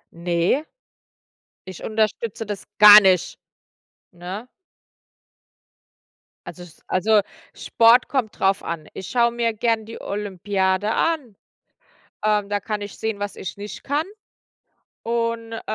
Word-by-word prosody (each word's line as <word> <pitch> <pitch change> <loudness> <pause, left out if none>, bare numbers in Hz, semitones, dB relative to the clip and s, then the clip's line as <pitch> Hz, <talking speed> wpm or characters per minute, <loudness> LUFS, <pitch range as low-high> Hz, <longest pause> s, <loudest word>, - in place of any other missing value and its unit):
Ne, 170 - 0 1.0
ich 185 -2 -10
unterstütze 220 0 -2
das 205 -2 -5 0.2
gar 210 0 +11
nicht, 190 -4 +1 0.7
ne? 185 +7 -8 2.0
Also 180 - -9
es 175 -3 -16
also 210 +3 +3 0.3
Sport 230 +2 +4
kommt 255 -6 -2
drauf 195 +1 +1
an. 165 -2 -5
Ich 190 - -8
schaue 235 -2 +2
mir 235 -1 -1
gern 225 0 -1
die 225 - -10
Olympiade 200 0 -1
an. 295 -11 -1 0.9
Ähm, 210 -1 +1
da 205 0 0
kann 210 +1 -4
ich 205 -1 -8
sehen, 220 -2 -3
was 205 0 -4
ich 190 - -7
nicht 205 +1 -8
kann 290 +3 -1 1.0
und, 230 0 -2
äh, 225 - -5
210 Hz, 120 wpm, -22 LUFS, 190-230 Hz, 2.0 s, gar